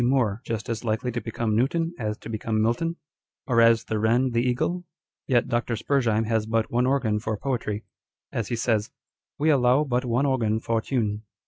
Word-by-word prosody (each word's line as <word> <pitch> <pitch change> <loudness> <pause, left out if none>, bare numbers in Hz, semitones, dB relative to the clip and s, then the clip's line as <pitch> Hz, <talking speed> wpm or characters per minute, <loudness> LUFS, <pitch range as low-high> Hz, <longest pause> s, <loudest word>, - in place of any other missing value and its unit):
Moore 120 -4 +2
just 115 -3 -4
as 115 -1 -3
likely 115 +2 -1
to 120 0 -3
become 115 -1 -2
Newton 165 +8 +1
as 105 -1 -2
to - - -11
become 110 0 -2
Milton? 120 +10 +1 0.5
Or 115 -3 +3
as 115 0 +5
the 110 - -2
wren 120 +4 +2
the 115 0 +2
eagle? 130 +9 0 0.4
Yet 120 -4 +2
Dr. 120 0 0
Spurzheim 115 -2 +1
has 110 -1 0
but 115 0 0
one 125 +1 +2
organ 125 -6 +1
for 110 0 -3
poetry, 115 -5 -2 0.5
as 115 -4 -2
he 120 - -1
says 110 -3 +1
â€" - - -36 0.3
" - - -68
We 155 - +3
allow 130 0 +4
but 125 -3 0
one 125 +2 +1
organ 115 -5 +1
for 115 0 0
tune." 110 -5 -1
115 Hz, 200 wpm, -25 LUFS, 110-125 Hz, 0.5 s, as